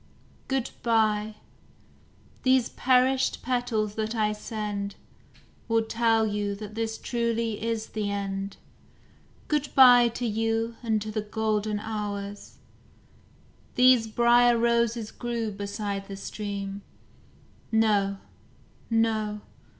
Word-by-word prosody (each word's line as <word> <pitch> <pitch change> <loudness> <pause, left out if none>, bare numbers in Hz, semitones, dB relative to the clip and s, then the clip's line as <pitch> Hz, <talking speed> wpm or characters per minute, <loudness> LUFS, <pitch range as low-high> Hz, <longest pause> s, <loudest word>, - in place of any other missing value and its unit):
Good 265 -2 -1
bye! 215 -2 +1 1.1
these 260 -2 +3
perished 260 +1 +2
petals 245 -4 -1
that 220 +1 -3
I 215 -1 +1
send 210 -2 -4 0.7
Will 225 0 +2
tell 225 0 +2
you 205 -1 -2
that 210 0 -8
this 225 0 -3
truly 230 -2 -2
is 225 -1 -2
the 210 -2 -3
end; 195 -1 -4 0.9
Good 295 -2 0
bye 245 -2 +8
to 235 +1 -4
you 225 +1 -1
and 220 -3 +1
to 215 - -5
the 215 0 -2
golden 215 0 -1
hours. 205 -2 -5 1.2
These 250 -2 +5
briar 240 +1 +4
roses 235 -1 +1
grew 235 -3 -3
beside 200 0 -4
the 195 - -6
stream 200 -1 -5 0.9
No, 205 -3 +2 0.7
no! 220 -2 0
220 Hz, 105 wpm, -27 LUFS, 210-235 Hz, 1.2 s, bye